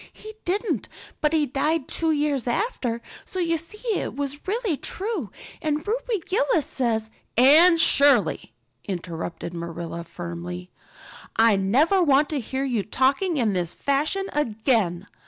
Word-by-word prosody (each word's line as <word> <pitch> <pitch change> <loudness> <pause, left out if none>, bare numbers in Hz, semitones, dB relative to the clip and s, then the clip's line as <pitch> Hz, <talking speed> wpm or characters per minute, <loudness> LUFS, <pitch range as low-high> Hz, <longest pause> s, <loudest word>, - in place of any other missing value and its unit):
He 435 0 -11
didn't, 365 - -1 0.3
but 300 - +2
he 315 -2 +2
died 285 +3 0
two 325 -1 +1
years 290 -5 0
after, 240 - -1 0.2
so - - -8
you 335 -2 +1
see 425 +6 -3
it - - -4
was 285 +2 -4
really 425 -4 0
true. 375 - -3 0.3
And 305 +1 -2
Ruby 450 -4 -1
Gillis 305 -5 +1
says 225 -4 -1
" - - -44
"Anne 315 +8 +7
Shirley," 285 -3 +3 0.3
interrupted 170 -2 -5
Marilla 170 0 -5
firmly, 175 +1 -7 0.6
"I 225 -1 +5
never 270 - +3
want 290 -3 +4
to 300 - 0
hear 265 +2 -3
you 245 -6 0
talking 270 - +1
in 225 -6 +1
this 175 -3 -1
fashion 300 +8 0
again. 220 -9 0
275 Hz, 140 wpm, -24 LUFS, 220-330 Hz, 0.6 s, Anne